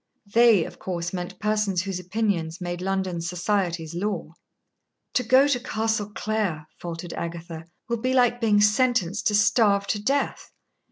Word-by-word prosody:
"They," 230 -7 +6
of - - -11
course, 175 -1 -4
meant 180 -1 -5
persons 210 -4 0
whose 190 -2 -3
opinions 180 -3 -2
made 175 -1 -4
London's 185 -3 -2
society's 175 -3 -1
law. 205 +4 -3 0.8
"To - - +2
go 260 +4 +5
to 275 -4 +1
Castle 220 -3 -1
Clare," 210 -10 -2
faltered 170 0 -6
Agatha, 165 -1 -6 0.2
"will 235 -2 -2
be 255 +2 0
like 245 -1 +3
being 210 -2 +4
sentenced 210 -3 +2
to 210 - +2
starve 205 -2 +3
to 205 +1 -2
death. 275 +7 -1
200 Hz, 150 wpm, -25 LUFS, 175-220 Hz, 0.8 s, They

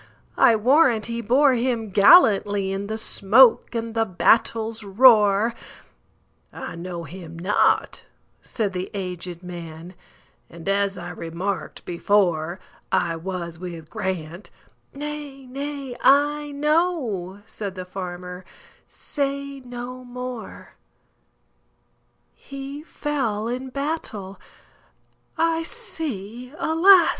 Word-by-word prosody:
I 230 - +7
warrant 245 0 +4
he 235 0 -3
bore 260 +5 +4
him 235 -3 -1
gallantlyIn 200 - +5
the 220 +1 -3
smoke 225 +3 +4
and 230 0 -3
the 225 0 +2
battle's 225 +3 +1
roar!""I 210 0 +1
know 170 0 -6
him 165 -1 -10
not," 185 +5 +1 0.4
said 210 -5 -3
the 180 0 -4
aged 180 -2 -5
man,"And, 170 0 -12
as 200 -1 +1
I 175 0 -6
remarked 180 +3 -5
before,I 175 -1 0
was 170 -1 -5
with 170 -3 -8
Grant"—"Nay, 270 - -7
nay, 275 0 -6
I 295 +2 +3
know,"Said 225 - -1
the 185 -1 -6
farmer, 180 -1 -7 0.4
"say 280 -1 -4
no 250 0 -8
more:"He 245 - -12
fell 260 -9 -2
in 255 +2 -4
battle,—I 285 +4 -5
see, 250 - -6
alas! 345 +3 +6
215 Hz, 85 wpm, -23 LUFS, 180-265 Hz, 0.4 s, I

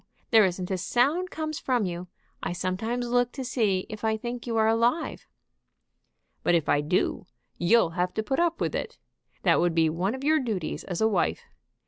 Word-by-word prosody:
There 220 -3 +7
isn't 180 0 -2
a 185 - -1
sound 285 - +1
comes 310 -2 -4
from 245 -5 0
you. 175 0 -5 0.3
I - - -2
sometimes 210 +7 -2
look 245 0 +2
to 265 - -5
see 210 -7 +1
if 215 -1 -8
I 220 0 +1
think 240 +2 -6
you 230 -1 -1
are 220 0 +4
alive." 235 +8 +1 1.1
"But 175 - +3
if 165 -3 +1
I 145 - +3
do, 180 +5 0 0.3
you'll 175 0 +4
have 180 +1 -1
to 220 - -1
put 265 +7 -1
up 340 -1 +1
with - - -1
it. 470 -1 -4 0.5
That - - +4
would 175 -2 +1
be 160 -1 +3
one 185 +8 -1
of 265 - -8
your 310 +2 +4
duties 215 - -3
as 180 0 -4
a 220 - +5
wife. 200 -5 0
220 Hz, 195 wpm, -27 LUFS, 180-245 Hz, 1.1 s, There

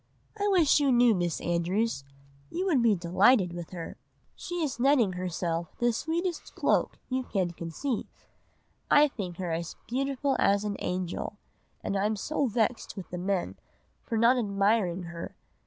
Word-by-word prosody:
I 410 -1 -1
wish 345 -8 +4
you 280 -2 +3
knew 240 -1 +5
Miss 175 -4 -1
Andrews, 175 +2 0 0.5
you 365 +3 -2
would 310 -10 +3
be 225 -3 +4
delighted 185 +2 +3
with 175 -1 -6
her. 170 -3 -7 0.4
She 350 -2 -4
is 275 -5 -3
netting 250 -7 +4
herself 170 -2 -3
the 240 -1 +2
sweetest 335 +6 -3
cloak - - +1
you 260 0 -1
can 190 -8 -1
conceive. 175 - -4 0.8
I 295 +1 +7
think 190 -10 -6
her 180 -3 -3
as 165 0 -3
beautiful 275 +2 0
as 200 +1 +3
an 205 -1 -2
angel, 180 +3 -3 0.5
and 200 - -2
I 195 +1 +2
am 215 - -1
so 280 +7 -1
vexed 225 0 -1
with 190 - -8
the 180 - -4
men 185 0 -1 0.4
for 230 - -3
not 235 +3 +5
admiring 200 -3 +1
her! 170 -1 -7
210 Hz, 160 wpm, -28 LUFS, 180-260 Hz, 0.8 s, I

